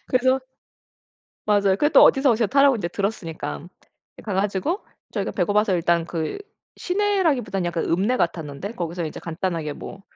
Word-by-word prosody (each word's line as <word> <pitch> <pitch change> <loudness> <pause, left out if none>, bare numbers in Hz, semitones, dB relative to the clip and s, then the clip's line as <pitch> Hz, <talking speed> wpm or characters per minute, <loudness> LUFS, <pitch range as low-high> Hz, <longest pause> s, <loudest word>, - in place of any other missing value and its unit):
그래서 260 +1 +2 1.1
맞아요. 205 -2 +3
근데 295 - +3
또 - - +7
어디서 270 -1 +5
어디서 225 -1 +1
타라고 275 +1 +4
인제 190 -7 -2
들었으니까 175 -6 -4 0.6
가 210 - -4
가지고 200 - -1 0.3
저희가 - - -2
배고파서 210 -1 +1
일단 170 -1 +1
그 165 - -3 0.4
시내라기보단 345 - 0
약간 170 -1 -2
읍내 200 +9 +1
같았는데 165 - -2
거기서 170 -4 -4
이제 155 - -6
간단하게 165 -2 -3
뭐 195 +6 -9
195 Hz, 370 characters per minute, -23 LUFS, 170-255 Hz, 1.1 s, 또